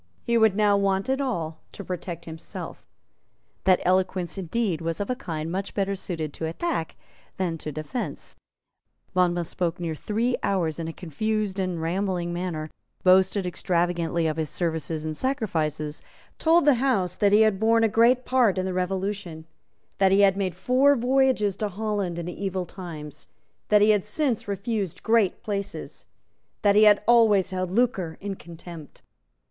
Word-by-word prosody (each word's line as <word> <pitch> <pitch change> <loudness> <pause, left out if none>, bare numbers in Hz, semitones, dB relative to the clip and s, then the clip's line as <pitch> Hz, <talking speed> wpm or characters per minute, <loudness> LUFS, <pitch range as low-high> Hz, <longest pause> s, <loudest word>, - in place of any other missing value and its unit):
He 235 - 0
would 220 -4 +4
now 210 -1 +4
want 195 +3 0
it 265 +1 +1
all 165 - -3
to 200 - -8
protect 175 -2 -6
himself. 160 0 -8 0.8
That 185 -1 +5
eloquence 185 -1 +1
indeed 190 -1 -1
was 165 0 -3
of 205 +5 -2
a - - 0
kind 160 -7 -5
much 195 +2 -4
better 200 -1 0
suited 160 -6 -4
to 160 - -4
attack 165 - -3 0.4
than 180 -3 -1
to 150 - -5
defence. 155 - -5 0.8
Monmouth 175 -2 +1
spoke 175 -1 -2
near 170 -2 -2
three 225 +9 -1
hours 170 -5 0
in 165 - -3
a - - -3
confused 205 +5 -2
and 185 -3 -1
rambling 175 +1 -1
manner, 170 -3 -4 0.3
boasted 190 +1 +4
extravagantly 175 -2 0
of 155 0 -1
his 155 -2 -1
services 160 -1 -2
and 155 0 -3
sacrifices, 160 - -2 0.4
told 330 0 +4
the 265 -5 +4
House 195 -10 +1
that 200 +1 +2
he 210 +1 +6
had 215 -3 +3
borne 225 +1 +3
a - - +5
great 235 +4 +3
part 245 -7 +3
in 185 - 0
the 190 - -2
Revolution, 185 -2 -3 0.5
that 190 -1 +4
he 195 +1 +5
had 195 -1 +5
made 190 -3 -2
four 255 +9 +4
voyages 250 -5 +2
to 210 - -1
Holland 200 -3 -2
in 170 - -4
the 175 +3 -6
evil 190 -2 -2
times, 155 -6 -9 0.4
that 210 -1 +5
he 215 - +6
had 205 -3 +2
since 235 0 -1
refused 200 -2 -3
great 225 -4 +2
places, 200 -2 -5 0.6
that 200 -1 +4
he 215 +1 +7
had 210 0 +6
always 215 -5 +4
held 185 -1 -2
lucre 190 -6 0
in 200 0 -4
contempt. 170 -3 -12
190 Hz, 165 wpm, -25 LUFS, 170-215 Hz, 0.8 s, he